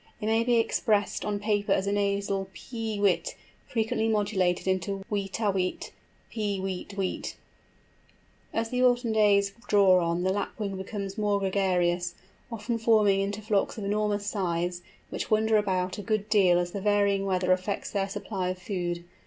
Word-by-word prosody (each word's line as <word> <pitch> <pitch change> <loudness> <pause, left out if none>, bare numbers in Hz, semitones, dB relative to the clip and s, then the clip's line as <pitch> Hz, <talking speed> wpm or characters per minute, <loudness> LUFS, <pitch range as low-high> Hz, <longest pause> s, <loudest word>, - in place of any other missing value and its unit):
It 210 - -4
may 225 +1 +2
be 240 0 +2
expressed 215 -2 +1
on 210 -1 -1
paper 205 -1 0
as 190 - 0
a 200 - 0
nasal 200 -1 0
pee 225 -4 -5
weet, 180 -4 +1 0.3
frequently 225 -1 0
modulated 200 -5 +1
into 195 +1 -1
weet 200 0 -2
a 210 -3 +2
weet, 185 -1 -2 0.4
pee 205 -3 -2
weet 190 +1 -5
weet. 190 -2 -3 1.1
As 225 0 -2
the 250 0 0
autumn 245 -2 +3
days 200 -2 +3
draw 195 -3 +5
on 170 +1 0
the 190 +1 +2
Lapwing 205 0 -3
becomes 195 +1 -5
more 205 -1 +2
gregarious, 180 -3 +1 0.4
often 230 +1 -3
forming 215 -3 +4
into 200 +2 -3
flocks 210 +1 0
of 215 - -5
enormous 205 0 0
size, 175 -3 -1 0.3
which - - -4
wander 220 0 +3
about 185 -2 0
a - - -3
good 215 0 -1
deal 190 -5 +5
as 175 0 -1
the 200 - -4
varying 200 -1 +2
weather 185 -1 +1
affects 185 +2 -1
their 195 -1 -1
supply 190 -2 -3
of 185 - -3
food. 175 -2 -3
200 Hz, 165 wpm, -28 LUFS, 190-215 Hz, 1.1 s, draw